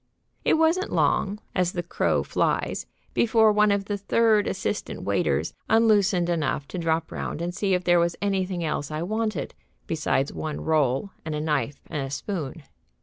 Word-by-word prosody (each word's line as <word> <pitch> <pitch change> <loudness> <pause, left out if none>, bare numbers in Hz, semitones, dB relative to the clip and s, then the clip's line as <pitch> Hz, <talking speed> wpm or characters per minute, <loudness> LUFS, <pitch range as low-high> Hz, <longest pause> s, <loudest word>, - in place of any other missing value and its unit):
It - - +4
wasn't 325 +5 +2
long, 200 +2 +1 0.2
as 180 -1 +1
the 175 - -2
crow 170 - 0
flies, - - -1 0.3
before 220 -1 +4
one 210 0 +4
of 200 -1 0
the 205 0 -3
third 215 +1 +3
assistant - - -3
waiters - - 0 0.2
unloosened 210 -5 +4
enough 150 -4 -1
to 185 - -4
drop 165 -1 0
round - - -4
and 175 +1 -3
see 195 0 +1
if 180 - -2
there 175 -1 +4
was 170 0 +1
anything 190 -3 -1
else 145 -2 -2
I 155 +1 -3
wanted 215 +3 -2 0.3
besides 150 -3 0
one 155 -2 -4
roll 150 +2 +1
and 155 -2 -3
a - - -2
knife 150 -3 -1
and 140 -4 -4
spoon. 160 -2 -4
175 Hz, 165 wpm, -25 LUFS, 155-205 Hz, 0.3 s, It